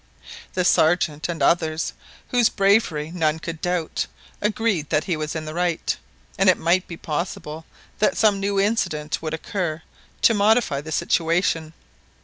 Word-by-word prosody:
The 180 -1 0
Sergeant 155 -2 +2
and 170 -1 -2
others, 160 -2 +1 0.4
whose 245 -3 +4
bravery 195 -7 +2
none 160 -3 +1
could 165 0 -6
doubt, 175 -2 -1 0.3
agreed 210 -7 0
that 155 - +2
he 175 - -1
was 155 0 -4
in 155 -1 -4
the 155 - -6
right, 175 -1 0 0.4
and 195 0 +5
it 185 - +5
might 175 +3 +1
be 170 - -7
possible 160 -1 -4 0.3
that 215 - +2
some 210 -3 +4
new 200 0 0
incident 195 -8 0
would 160 0 -2
occur 165 -2 -3 0.4
to 230 - +6
modify 210 - +3
the 160 +2 -8
situation. 165 0 +1
170 Hz, 150 wpm, -23 LUFS, 155-195 Hz, 0.4 s, to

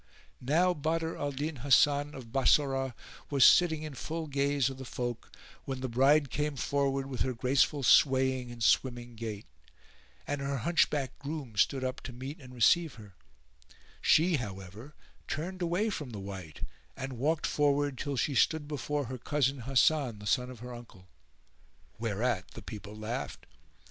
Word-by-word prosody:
Now 165 +8 +3
Badr 160 +1 -1
al 145 0 -2
Din 145 +2 -4
Hasan 145 +3 +3
of 120 -4 -10
Bassorah 135 -1 +2 0.3
was 140 -2 +5
sitting 160 -3 +5
in 155 -2 -6
full 160 +4 -4
gaze 140 -2 +1
of 135 -1 -5
the - - -6
folk, 120 -2 -5 0.3
when 130 -1 -4
the 130 - -2
bride 135 +3 +3
came 150 -1 -1
forward 135 0 0
with 130 -3 -5
her 130 -1 0
graceful 135 +4 +2
swaying 130 -1 +4
and 120 -1 -6
swimming 120 -1 +1
gait, 110 -2 -6 0.8
and 145 -1 -3
her 140 0 -2
hunchbacked 150 -5 +1
groom 140 -5 -6
stood 130 +6 +2
up 130 +1 -3
to 125 - -8
meet 135 +6 -7
[FN#411] - - -14
and 125 - -12
receive 160 +6 +4
her: 105 -4 -13 0.9
she, 165 +1 +4
however, 105 +4 -8 0.3
turned 180 +4 -4
away 180 +6 0
from 150 -8 -5
the 110 -4 -7
wight 95 -5 -8 0.4
and 135 0 -5
walked 155 +4 +1
forward 145 -1 +1
till 140 +2 -3
she 140 +5 0
stood 150 +4 +2
before 145 -1 -2
her 130 +1 -6
cousin 140 0 0
Hasan, 135 0 +2
the 105 - -11
son 125 +6 +1
of 125 -3 -10
her 125 0 -7
uncle. 105 -6 -13 0.9
Whereat 110 -1 -1
the - - -8
people 105 -1 -8
laughed. 110 +4 -5
135 Hz, 165 wpm, -30 LUFS, 120-145 Hz, 0.9 s, was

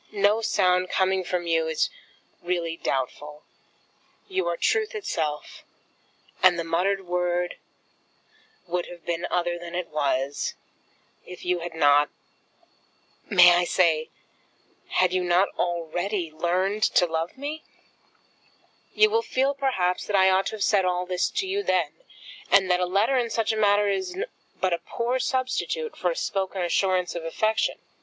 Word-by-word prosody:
No 205 +2 +2
sound 185 -4 +2
coming 190 0 +1
from 180 0 -2
you 165 -1 +1
is 160 - 0 0.5
really 175 -2 -2
doubtful. 150 +1 -4 0.8
You 380 -1 -1
are - - -1
truth 440 -1 0
itself, 155 - -4 0.8
and 185 -2 +6
the 170 - -2
muttered 185 +4 0
word 180 0 -1 1.1
would 175 0 -2
have 175 -1 -12
been 170 0 -2
other 175 -1 -1
than 175 0 -8
it 180 -1 -3
was, 140 -2 -1 0.7
if 180 - -10
you 180 0 +1
had 170 -1 -7
not! 145 -1 +4 1.2
may 175 -3 +8
I 175 0 +3
say, 165 -3 +2 0.8
had 185 -1 +2
you 185 -1 +1
not 180 +2 +3
already 175 +1 -2
learned 185 +6 -1
to - - +6
love 165 +3 -3
me? 295 +3 -5 1.3
You 430 0 +5
will 455 +1 +3
feel, 270 - 0
perhaps, 245 -11 -1
that 205 - 0
I 190 0 +5
ought 190 +1 +2
to - - -4
have 210 - -2
said 200 -3 +3
all 180 0 0
this 180 0 0
to 385 - -2
you 395 +2 -1
then, - - +1 0.6
and 190 -2 +4
that 180 - +3
a 180 - 0
letter 205 +8 +2
in 235 -1 -1
such 225 -1 0
a - - -2
matter 205 -1 +3
is 365 - -2 0.4
but 185 -2 +1
a 170 - -1
poor 240 +8 -2
substitute 260 - -2
for - - -1
a - - -2
spoken 190 - -2
assurance 180 0 +1
of 170 - -5
affection. 215 +7 0
180 Hz, 155 wpm, -25 LUFS, 170-210 Hz, 1.3 s, may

